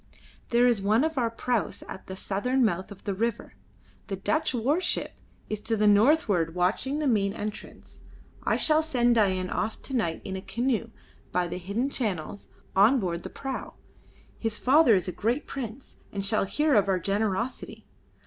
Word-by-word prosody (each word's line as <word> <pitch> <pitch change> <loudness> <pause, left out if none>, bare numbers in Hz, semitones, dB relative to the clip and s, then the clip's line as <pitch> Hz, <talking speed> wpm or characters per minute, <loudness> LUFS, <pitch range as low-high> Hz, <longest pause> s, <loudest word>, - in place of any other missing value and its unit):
"There 240 +1 +4
is 235 -5 +3
one 215 +6 +3
of 320 0 -1
our 240 -4 +1
praus 230 -3 -2
at 190 - -9
the 190 - -6
southern 245 +7 0
mouth 190 -1 -1
of 200 - -11
the 200 - -2
river. 225 - -2 0.5
The 195 - -3
Dutch 305 - 0
warship 270 +9 0 0.4
is 215 -1 -4
to 225 +1 -1
the 210 - +2
northward 205 - +4
watching 190 +10 0
the 305 - -1
main 205 -6 +2
entrance. 210 0 -8 0.4
I - - +1
shall 310 0 +3
send 245 -6 +2
Dain 190 -5 +1
off 220 - -2
to 270 - -4
night 170 -9 -1
in 190 - -4
a 190 - -4
canoe, 235 +1 -1 0.4
by 180 0 +1
the 175 +1 -5
hidden 210 +9 -2
channels, 200 - -3 0.3
on 220 +8 +6
board 175 -4 -2
the - - -7
prau. 270 -1 -6 0.6
His 225 -1 -1
father 260 -3 +5
is 185 0 0
a - - -1
great 235 - -1
prince, 260 -1 -7
and 195 -1 -3
shall 215 0 +2
hear 300 +9 +1
of 205 -4 +4
our 190 -1 +2
generosity. 205 +6 -2
220 Hz, 175 wpm, -27 LUFS, 195-250 Hz, 0.6 s, on